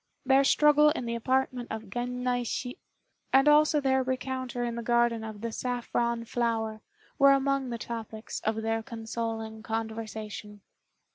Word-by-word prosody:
Their 265 +1 +5
struggle 300 +1 +5
in 295 -5 -2
the 235 - -2
apartment 250 +1 0
of 220 -3 -6
Gen 245 +2 -3
naishi, 245 0 -2 0.5
and 270 +2 +5
also 300 +1 +5
their 265 -2 +2
rencontre 255 -1 -2
in 235 - -3
the 235 - -4
garden 235 -1 +2
of 215 -2 -7
the 230 0 -3
"Saffron 235 -1 -1
Flower," 225 -2 -1 0.4
were 275 0 +7
among 275 -1 +1
the 235 - -3
topics 225 -1 -6
of 220 0 -2
their 225 0 0
consoling 225 -1 -5
conversation. 220 -2 -5
235 Hz, 145 wpm, -28 LUFS, 225-260 Hz, 0.5 s, were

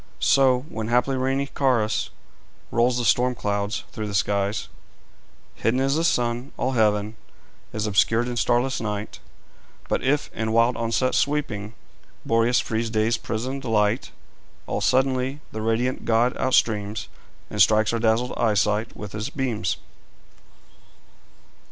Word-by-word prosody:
So, 130 -2 +4
when 110 -7 -5
haply 125 +3 +2
rainy 135 +2 0
Caurus 125 -6 0 0.6
Rolls 120 +1 +2
the 120 - -1
storm 125 +2 +3
clouds 100 0 -2
through 110 -2 -5
the 100 - -4
skies, 100 +1 0 0.9
Hidden 120 +3 0
is 135 +1 +1
the 160 - +1
sun; 120 -4 0
all 130 - 0
heaven 110 -2 +1 0.5
Is 110 0 -2
obscured 110 +3 +2
in 125 - -3
starless 120 +2 +1
night. 105 -1 -4 0.7
But - - 0
if, 145 +2 0
in 110 0 -2
wild 115 +1 +3
onset 115 +3 0
sweeping, 115 -8 -1 0.5
Boreas 115 +2 +3
frees 115 0 -2
day's 110 +1 +1
prisoned 130 +5 -4
light, 110 -1 +1 0.6
All - - -3
suddenly 130 +1 +1
the 110 - -5
radiant 115 +3 0
god 120 +2 +2
outstreams, 110 -5 +1 0.4
And 105 - 0
strikes 110 +3 +4
our 115 - 0
dazzled 115 +2 +1
eyesight 105 0 +1
with 105 -1 -7
his 105 0 -4
beams. 115 -10 -2
115 Hz, 135 wpm, -24 LUFS, 110-130 Hz, 0.9 s, So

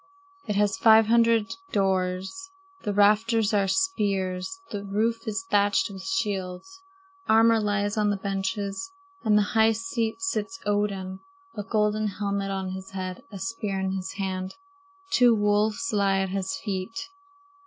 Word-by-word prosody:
It 210 - -1
has 205 -1 +2
five 220 -1 +7
hundred 230 -1 +3 0.2
doors. 190 - -1 0.3
The 205 - -2
rafters 215 +2 +3
are 200 -2 +2
spears. 200 - -1
The 205 -1 -4
roof 225 +4 -1
is 220 +6 -2
thatched 205 +2 +3
with 190 -1 -8
shields. 215 - -3 0.5
Armor 225 +1 +5
lies 205 0 0
on 210 -1 +2
the 205 - 0
benches. 195 - -3 0.3
In 215 -2 +3
the 210 - +5
high 225 0 +5
seat 230 - -2
sits 385 - -2
Odin, 200 -2 -1 0.4
a - - -3
golden 210 +1 0
helmet 200 -1 -2
on 190 -1 -3
his 190 0 -7
head, 185 0 -5
a 200 - -7
spear 200 -1 -3
in 190 0 -1
his 190 0 -4
hand. 190 -1 -4 0.6
Two 245 -2 +5
wolves 210 +5 +1
lie 200 -2 +2
at 190 - -1
his 195 +8 -2
feet. 215 - -4
205 Hz, 145 wpm, -26 LUFS, 195-225 Hz, 0.6 s, five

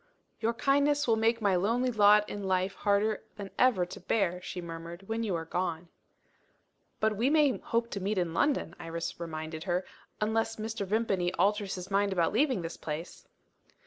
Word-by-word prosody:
"Your 230 +1 0
kindness 285 +2 +2
will 225 - +4
make 225 +1 +1
my 200 -2 +3
lonely 230 +7 +1
lot 210 -1 +5
in 205 - -5
life 190 0 +1
harder 205 +1 +1
than 200 -2 -7
ever 230 -9 +4
to 180 - -9
bear," 180 -2 0
she 180 - -6
murmured, 170 +2 -8
"when 225 +1 -2
you 210 -6 -1
are 165 -1 -3
gone." 175 0 -3 1.1
"But 215 0 +2
we 235 +6 +2
may 295 -3 +3
hope 230 0 -1
to 200 - -3
meet 200 +2 -1
in 175 -3 0
London," 270 - +1
Iris 165 +1 -5
reminded 160 -1 -5
her; 180 0 0 0.3
"unless 225 +1 0
Mr. 220 -2 -4
Vimpany 195 -4 +1
alters 200 +2 +1
his 185 +1 -8
mind 200 0 +2
about 170 -1 +1
leaving 255 - +2
this 165 0 -5
place." 160 +3 -6
200 Hz, 175 wpm, -30 LUFS, 175-225 Hz, 1.1 s, lot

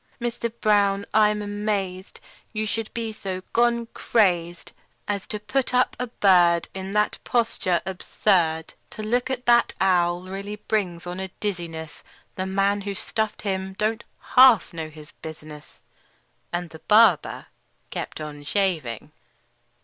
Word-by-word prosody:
Mister 235 -1 -2
Brown, 205 -3 +2
I'm 210 0 +3
amazed 205 -2 -3 0.3
You 215 0 -1
should 220 +1 -3
be 225 -1 -4
so 190 -3 -5
gone 235 0 +3
crazed 175 -6 +1 0.4
As 200 -2 -2
to 210 - -3
put 250 +4 -1
up 250 - +3
a 250 - -2
bird 175 -6 +4
In 190 +1 -5
that 210 0 +1
posture 225 -7 0
absurd! 175 -3 0 0.2
To 215 - -7
look 245 +4 0
at 250 -1 -3
that 240 0 +4
owl 175 -2 +2
really 195 +2 -6
brings 195 -5 -2
on 180 +1 -5
a 190 - -3
dizziness; 170 -6 -5 0.3
The 185 0 -3
man 195 +1 +1
who 200 0 -4
stuffed 220 +2 -2
him 190 -1 -2
don't 220 +2 0 0.3
half 250 -9 +7
know 160 -1 -5
his 155 -1 -13
business!" 155 -1 -11 0.7
And 175 -1 -3
the 160 - -11
barber 210 -6 +4 0.5
kept - - -5
on 150 -1 -7
shaving. 155 - -1
195 Hz, 140 wpm, -24 LUFS, 175-215 Hz, 0.7 s, half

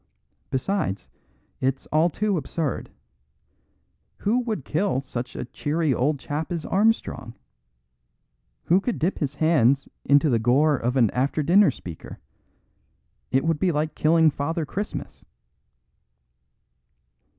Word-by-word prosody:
Besides, 130 - -2 0.5
it's 130 0 -1
all 155 +3 +3
too 205 +4 -1
absurd. 155 -1 -3 1.3
Who 225 +5 +1
would 220 - -3
kill 160 -4 0
such 125 -2 -6
a - - -4
cheery 150 +3 -1
old 145 +5 +1
chap 150 +4 -4
as 170 -3 -3
Armstrong? 200 - 0 1.3
Who 180 +4 +3
could 240 +2 -2
dip 175 +5 -1
his 145 -2 -2
hands 140 -4 +3 0.2
in 140 - +5
the 140 -6 +2
gore 140 +7 +3
of 125 0 -2
an 115 -5 +4
after 140 +4 0
dinner 185 +5 +5
speaker? 90 - -8 1.1
It 135 +4 +1
would 165 -2 +1
be 180 +1 +2
like 155 0 -1
killing 160 0 +4
Father 160 +3 -2
Christmas." 200 +9 -6
150 Hz, 120 wpm, -24 LUFS, 130-170 Hz, 1.3 s, in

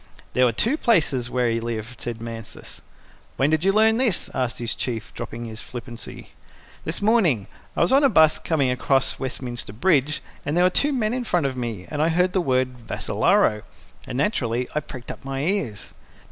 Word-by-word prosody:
"There 125 - +4
were 120 - +3
two 230 - +1
places 150 - +2
where 125 -1 +1
he 115 0 +1
lived," 115 +1 -5
said 120 -2 -4
Mansus. 115 -2 -9 0.6
"When 140 +3 +2
did 155 +1 +2
you 195 - +4
learn 220 +2 +4
this?" 235 -8 +1
asked 125 -1 -1
his 120 -1 -2
Chief, 115 -3 -4
dropping 120 +1 -6
his 110 -1 -7
flippancy. 120 -1 -8 0.6
"This 165 +5 -3
morning. 185 - +3 0.3
I - - +2
was 170 - +3
on 275 +2 +5
a 275 - +6
bus 160 -8 +5
coming 140 -6 +1
across 135 +1 +1
Westminster 125 -5 -4
Bridge, 150 - +2 0.2
and 150 +4 -1
there 175 - +5
were 185 - +4
two 290 +10 +2
men 230 -5 0
in 255 0 -1
front 175 -9 +1
of 135 -1 -1
me, 115 -7 -4
and 150 -1 -1
I 160 - +3
heard 180 +2 +2
the 185 - +2
word 130 -4 0
'Vassalaro' 105 0 +2 0.5
and 125 - -4
naturally 125 - 0
I 150 - +1
pricked 130 -4 -8
up - - -11
my 135 0 -3
ears." 160 - -2
135 Hz, 195 wpm, -23 LUFS, 120-180 Hz, 0.6 s, a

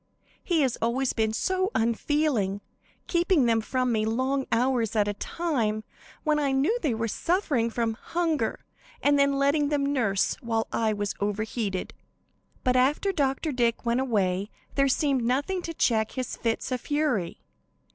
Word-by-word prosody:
He 340 -4 +2
has 260 -3 0
always 250 +3 +1
been 220 -1 +1
so 375 - 0
unfeeling; 230 -3 +1 0.4
keeping 345 -5 +2
them 225 -1 +3
from 255 +2 0
me 215 -2 +1
long 260 +5 0
hours 235 -2 +1
at 210 -1 +3
a 205 - 0
time, 225 -6 -1 0.4
when 305 -1 +2
I 280 -2 +1
knew 275 - +2
they 260 -7 0
were 225 +1 -1
suffering 290 - 0
from 230 -1 -1
hunger, 330 +6 -2 0.4
and 285 0 +4
then 280 0 +4
letting 285 +1 +2
them 290 -2 +1
nurse 200 -8 +1
while 225 -2 -1
I 220 -1 +1
was 205 -1 -2
overheated. 205 -1 -2 0.7
"But 255 -1 +2
after 280 +10 +2
Dr. 285 -2 0
Dick 240 -2 0
went 235 +1 +2
away 200 -6 0 0.2
there 275 - +3
there - - +3
seemed 270 -1 +1
nothing 285 +10 0
to 335 - -5
check 220 -5 +1
his 255 -2 -3
fits 230 +3 -2
of 255 - -1
fury. 290 - -1
255 Hz, 160 wpm, -27 LUFS, 225-290 Hz, 0.7 s, and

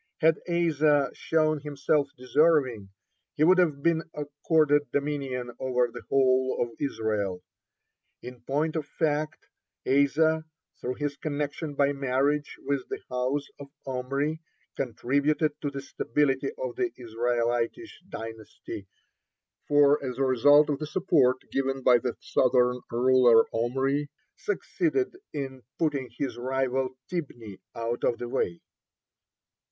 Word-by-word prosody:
Had 160 -1 +4
Asa 150 -5 +2
shown 155 -1 +1
himself 145 0 0
deserving, 130 -5 +2 0.5
he 150 - +2
would 185 +3 +6
have 150 -6 +1
been 165 -1 +3
accorded 145 0 +1
dominion 140 -4 -2
over 125 -2 +1
the - - -7
whole 130 -1 +3
of 120 - 0
Israel. 105 -8 -2 0.8
(23) - - -8
In 125 -1 -10
point 155 +4 0
of 155 -3 -2
fact, 155 +1 -1 0.4
Asa, 155 +4 +3 0.3
through 125 +1 -3
his 145 -1 -3
connection 145 0 -3
by 140 0 +2
marriage 140 +2 0
with 140 -2 -2
the - - -3
house 130 +3 -1
of 140 - -8 0.2
Omri, 140 +4 -2 0.3
contributed 140 +5 0
to 145 - -1
the 140 -1 -6
stability 140 - 0
of - - -4
the 370 -2 0
Israelitish 120 - -2
dynasty, 110 - -8 0.8
for 145 0 +4
as 125 -2 -4
a 135 - +1
result 145 +4 +5
of 140 - -2
the 155 - -4
support 150 -7 +3
given 135 0 -1
by 125 -1 +6
the 125 0 -3
southern 125 -1 +2
ruler 120 -1 +5
Omri 135 +5 0 0.3
succeeded 370 +3 -1 0.2
in 135 -2 -5 0.2
putting 145 -6 -1
his 125 -4 -3
rival 130 0 -1
Tibni 120 - -6 0.2
out 115 +1 -3
of 120 - +2
the 120 - -5
way. 85 -7 -2
140 Hz, 125 wpm, -27 LUFS, 125-150 Hz, 0.8 s, would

